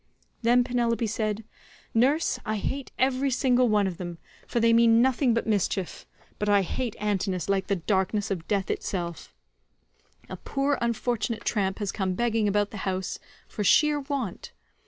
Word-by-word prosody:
Then 245 +1 +4
Penelope 240 -2 0
said, 215 0 -2 0.5
"Nurse,147 275 +8 +2
I 215 - 0
hate 270 +6 -4
every 265 +1 +1
single 255 -1 +3
one 210 -2 +3
of 185 -3 -3
them, 175 -2 -6 0.3
for 235 - 0
they 230 0 +4
mean 230 0 +5
nothing 255 -1 +3
but 230 - 0
mischief, 200 -3 -1 0.3
but 210 - 0
I 200 -1 +4
hate 235 +4 -3
Antinous 190 -4 -1
like 195 -1 0
the 200 - +1
darkness 195 +3 0
of 170 -4 -3
death 195 -2 0
itself. 170 -4 -4 1.0
A 185 - -7
poor 275 +7 -1
unfortunate 235 -1 -1
tramp 195 -3 0
has 205 -3 -2
come 190 -3 -2
begging 225 -1 +1
about 205 0 +1
the 215 - -7
house 190 -1 -3 0.3
for 210 - -4
sheer 300 +8 +4
want. 270 - -4
215 Hz, 160 wpm, -26 LUFS, 195-245 Hz, 1.0 s, mean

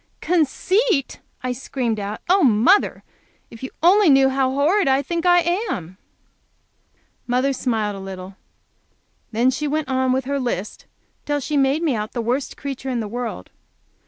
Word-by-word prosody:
"Conceit!" 360 - +1 0.2
I 255 - -1
screamed 245 -3 -3
out. 205 +1 -5
"Oh, 375 +1 +4
mother, 245 - +3 0.5
if 230 - -12
you 260 - -5
only 380 +1 +6
knew 270 -1 +5
how 265 -1 +1
horrid 300 +9 +2
I 270 +1 +3
think 340 +4 -2
I 350 0 +6 0.3
am!" 180 - -5 1.3
Mother 255 +3 +1
smiled 220 -5 -1
a - - -7
little. 190 0 -8 1.0
Then 240 +3 +2
she 295 +3 -3
went 300 -1 -2
on 260 -1 +1
with 260 0 0
her 280 +1 -1
list 225 -6 -4 0.4
till 290 0 0
she 295 +2 -3
made 275 +3 +2
me 310 -5 +1
out 215 -1 -4
the 240 - -2
worst 255 +4 -2
creature 270 -1 -5
in 250 -2 -1
the 220 - -3
world. 230 - -5
265 Hz, 160 wpm, -21 LUFS, 235-295 Hz, 1.3 s, only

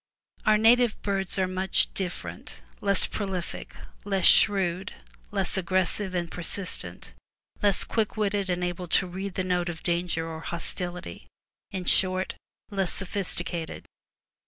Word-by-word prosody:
Our 215 0 +6
native 235 +1 +4
birds 195 -2 0
are 190 -1 +2
much 185 +1 +1
different, 85 - -6 0.2
less 200 -1 +8
prolific, 190 -4 -5 0.3
less 195 -2 0
shrewd, 190 -2 +4 0.3
less 195 -2 -1
aggressive 185 +1 -1
and 170 -1 -2
persistent, 180 +2 -4 0.5
less 205 -3 +2
quick 220 -1 -1
witted 205 -2 0
and 180 0 -1
able 180 0 -3
to 185 - +2
read 190 +1 -6
the 185 - -1
note 180 -1 0
of 165 -2 -7
danger 170 -1 -1
or 160 -1 -6
hostility, 175 - -5 0.2
— - - -67
in 185 -1 -4
short, 185 0 +3 0.4
less 195 -3 0
sophisticated. 180 -4 -4
185 Hz, 135 wpm, -27 LUFS, 175-200 Hz, 0.5 s, less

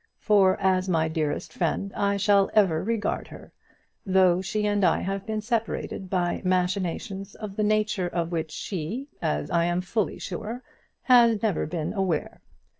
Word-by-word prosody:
For 200 -3 +3
as 190 -1 +1
my 160 -2 +2
dearest 155 -2 -2
friend 195 +3 -1
I 200 0 +1
shall 200 0 +3
ever 180 -6 +3
regard 225 +1 -1
her, - - -13 0.5
though 185 -2 +3
she 210 +3 -2
and 205 -1 +1
I 170 - +3
have 195 +1 -3
been 215 -1 -2
separated 220 -4 -3
by 180 -2 0
machinations 185 +2 -1
of 210 -3 -7
the 215 - -1
nature 210 -3 +1
of 170 -1 -2
which 160 -2 -2
she, 205 - -5
as 75 0 -1
I 170 0 +2
am 175 +1 0
fully 200 +3 -2
sure, 230 +4 -6 0.4
has 235 -4 +5
never 205 -9 0
been 165 +2 -3
aware. 190 -7 -2
190 Hz, 160 wpm, -26 LUFS, 175-210 Hz, 0.5 s, has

